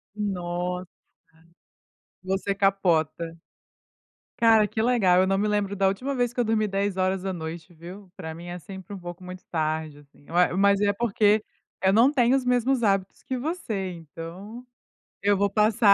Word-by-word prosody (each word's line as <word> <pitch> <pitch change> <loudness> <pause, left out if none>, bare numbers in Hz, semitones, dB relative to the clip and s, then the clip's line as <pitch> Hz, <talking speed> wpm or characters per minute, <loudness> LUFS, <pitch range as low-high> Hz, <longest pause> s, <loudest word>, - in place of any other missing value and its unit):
Nossa. 180 -3 -3 1.4
Você 190 +1 -1
capota. 170 -4 +1 1.0
Cara, 225 -2 +5
que 220 - -4
legal, 200 -7 +4
eu 190 - +3
não 195 0 +2
me 210 - +1
lembro 200 -1 0
da 195 - +2
última 250 +9 -1
vez 245 -2 0
que 245 - -2
eu - - +3
dormi 215 -1 +1
22h, 185 -4 -2
viu. 180 +4 -11
Pra 160 0 -6
mim 170 +1 -10
é 175 0 -6
sempre 190 +2 -9
um - - -7
pouco 175 +1 -9
muito 180 0 -9
tarde, 155 -2 -2
assim, 145 0 -21
eu 170 - -6
a 180 0 +3
mas 200 0 +4
é 205 0 +3
porque 215 -1 +2 0.4
eu 190 0 +4
não 235 +6 +6
tenho 250 -1 +4
os 265 - -1
mesmos 250 0 +2
hábitos 195 -2 0
que 260 - -3
você, 235 - -3
então, 175 - -9 0.6
eu 200 0 +3
vou 200 0 +2
passar 215 +1 +3
195 Hz, 165 wpm, -25 LUFS, 175-215 Hz, 1.4 s, não